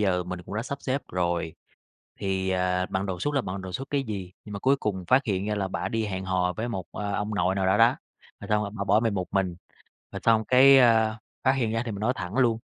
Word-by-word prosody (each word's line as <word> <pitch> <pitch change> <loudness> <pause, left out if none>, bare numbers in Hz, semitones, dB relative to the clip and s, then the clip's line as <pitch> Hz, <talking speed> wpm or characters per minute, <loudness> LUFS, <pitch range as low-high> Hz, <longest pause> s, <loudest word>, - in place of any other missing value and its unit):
giờ 95 -3 +2
mình 90 0 -6
cũng 100 - -8
đã 110 - -1
sắp 140 +2 -5
xếp 135 +1 -1
rồi 85 -3 -1 0.7
thì, 95 -1 -1
à, 90 0 +1
bận 95 +1 -2
đột 90 -2 -4
xuất 145 - -1
là 140 - +2
bận 95 -3 -5
đột 95 -1 -7
xuất 135 +8 -5
cái 140 -1 0
gì, 95 -6 -5
nhưng 105 - -8
mà 100 - -4
cuối 135 +1 +3
cùng 95 -8 -3
phát 130 +6 +4
hiện 100 -2 -1
ra 105 0 -1
là 100 -2 -1
bả 95 - -3
đi 115 -1 -1
hẹn 95 -2 -4
hò 90 -1 0
với 115 +2 -3
một, 95 -6 -4
a, 100 +1 -3
ông 105 +1 -2
nội 95 -2 +1
nào 95 -1 0
đó 95 +2 +3
đó. 115 +2 +5 0.4
Rồi 100 - -9
xong 105 -1 +2
bả 100 - -2
bỏ 105 +2 +4
mình 115 -2 0
một 95 -2 -2
mình, 95 -3 0 0.6
rồi 100 - -5
xong 110 -1 +4
cái, 135 +3 +7
ơ, 110 -3 +4 0.3
phát 130 - +5
hiện 120 -5 0
ra 115 0 0
thì 115 - -4
mình 100 - -6
nói 120 +4 +2
thẳng 90 +3 -5
luôn, 115 -3 +3
100 Hz, 270 wpm, -26 LUFS, 95-115 Hz, 0.7 s, cái